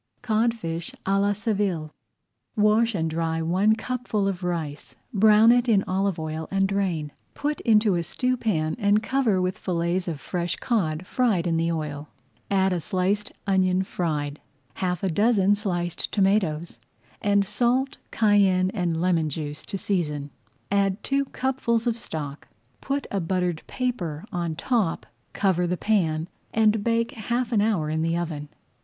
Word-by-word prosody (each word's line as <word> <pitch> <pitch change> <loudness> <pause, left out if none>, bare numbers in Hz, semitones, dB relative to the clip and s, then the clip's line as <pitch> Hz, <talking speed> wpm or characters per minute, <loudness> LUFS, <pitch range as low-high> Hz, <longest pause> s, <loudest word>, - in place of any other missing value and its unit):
CODFISH 215 -8 -1
À 195 +1 +2
LA 200 0 +2
SEVILLE 195 -7 -1 0.6
Wash 215 +1 +3
and 165 -3 0
dry 160 0 -1
one 185 +7 +3
cupful 225 -3 -2
of 190 -2 -3
rice, 155 -6 -4 0.2
brown 215 +2 +6
it 245 0 +3
in 200 -3 +4
olive 190 0 0
oil, 155 0 -4
and 195 0 +2
drain. 185 -7 -1 0.2
Put 295 0 -2
into 215 -3 +4
a 175 - +1
stewpan 215 -6 0
and 205 0 +3
cover 240 -7 +1
with 185 0 -1
fillets 175 0 -1
of 160 -4 -3
fresh 175 +1 -2
cod, 180 -8 -1
fried 215 -6 +1
in 170 -1 +1
the 165 +1 +1
oil. 150 -2 -4 0.4
Add 190 -1 +2
a 175 - 0
sliced 195 +4 -1
onion 190 -2 +2
fried, 150 -6 -3 0.3
half 180 -1 -2
a - - +2
dozen 205 +2 +3
sliced 175 -4 -2
tomatoes, 190 -5 +1 0.4
and 200 -1 +3
salt, 245 +6 +1
cayenne, 195 -4 +3
and 175 -6 -1
lemon 170 -3 +2
juice 150 0 -5
to 200 - -3
season. 150 -8 -2 0.4
Add 200 0 +1
two 275 0 +1
cupfuls 250 -4 -1
of 235 -2 +1
stock, 150 -10 -6 0.3
put 275 0 -2
a 200 - 0
buttered 180 -1 -1
paper 195 - -3
on 170 -2 -2
top, 215 -2 0 0.3
cover 180 -3 +1
the 180 +1 -1
pan, 165 -7 +1 0.3
and 215 -1 +3
bake 230 0 +1
half 240 +3 -2
an 215 -3 +3
hour 205 -8 +1
in 155 +1 -1
the 165 +1 0
oven. 155 -4 -4
190 Hz, 150 wpm, -25 LUFS, 165-215 Hz, 0.6 s, brown